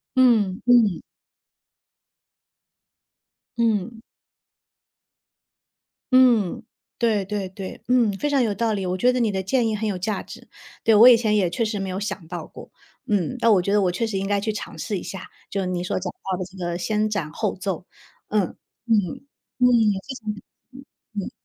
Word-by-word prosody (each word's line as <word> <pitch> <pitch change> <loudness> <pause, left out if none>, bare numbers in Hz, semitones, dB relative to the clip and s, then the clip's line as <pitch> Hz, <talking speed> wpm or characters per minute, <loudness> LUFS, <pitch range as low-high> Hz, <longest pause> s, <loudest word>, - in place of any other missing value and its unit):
嗯 220 -7 +3
嗯。 235 -7 +4 2.6
嗯。 225 0 0 2.1
嗯， 240 -4 +4 0.3
对 215 -4 +1
对 200 -1 -3
对， 190 0 -8
嗯， 245 -4 +3
非 295 +10 -2
常 280 -2 +2
有 215 - 0
道 225 +2 0
理， 195 -2 -2
我 180 +1 -1
觉 250 +5 +4
得 250 - -1
你 225 -3 +2
的 190 - -2
建 230 +5 +1
议 220 - 0
很 215 +1 -2
有 190 - -2
价 195 +2 -2
值。 - - -12 0.4
对， 225 - +4
我 230 +4 +9
以 240 - +8
前 215 -2 +1
也 185 -4 +2
确 225 +7 -1
实 215 -1 -2
没 195 -1 -3
有 185 +1 -3
想 195 -4 -5
到 170 -2 -6
过， - - -12 0.4
嗯， 205 +2 0
那 230 -1 +4
我 190 -4 +5
觉 200 +3 -1
得 210 - +4
我 180 - +2
确 185 +6 -1
实 220 -3 -2
应 195 +1 -2
该 205 0 +1
去 215 +2 -2
尝 210 - -7
试 210 -4 -3
一 - - -6
下， 190 - -7 0.2
就 200 - -2
是 185 - -2
你 180 -1 -2
所 180 - -2
讲 180 0 -4
到 190 -2 -5
的 185 - -4
这 190 +1 -15
个 175 -1 -3
先 215 +3 0
斩 175 -8 -3
后 210 +5 -2
奏， 185 -2 -4 0.4
嗯， 210 0 +2 0.4
嗯， 225 -2 +3 0.6
嗯。 250 - +5 0.4
谢 275 - -7
谢 220 -4 -13
你， 210 - -10 0.3
嗯， 270 +1 -12 0.4
嗯。 - - -7
205 Hz, 200 characters per minute, -23 LUFS, 190-230 Hz, 2.6 s, 我